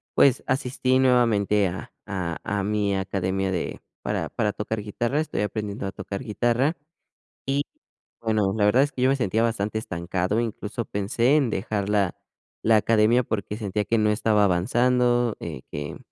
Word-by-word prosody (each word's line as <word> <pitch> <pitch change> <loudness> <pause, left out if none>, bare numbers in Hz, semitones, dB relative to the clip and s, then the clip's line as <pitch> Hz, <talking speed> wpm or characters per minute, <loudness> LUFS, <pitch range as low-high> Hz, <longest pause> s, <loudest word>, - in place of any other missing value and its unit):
pues, 130 -2 +4
asistí 130 0 +1
nuevamente 110 -6 +3
a 90 +2 -6
a 90 -5 -3
a 100 0 -1
mi 105 -1 0
academia 95 0 -1
de 90 - -3 0.2
para - - -2
para 105 -3 -1
tocar 105 +1 -3
guitarra. 120 +7 -1
Estoy 155 - -2
aprendiendo 105 -1 -3
a 95 - -3
tocar 100 +4 -6
guitarra, 120 +7 +1 0.7
y 140 +1 +1 0.6
bueno, 110 -4 +1
la 105 - +1
verdad 115 +6 +5
es 145 - -3
que 125 - -4
yo 130 - +4
me 140 - +2
sentía 110 -1 +1
bastante 110 -2 -1
estancado, 90 +2 -2
incluso 115 0 -3
pensé 115 +8 +1
en 140 -5 +3
dejar 100 0 -2
la 100 -3 +1 0.5
la 110 -1 +5
academia 115 +3 +3
porque 105 -1 -3
sentía 105 -1 -2
que 115 - +1
no 105 -1 +3
estaba 105 -1 +3
avanzando, 120 +5 +2
eh, 65 - -6
que, 75 0 -5
105 Hz, 165 wpm, -25 LUFS, 100-120 Hz, 0.7 s, verdad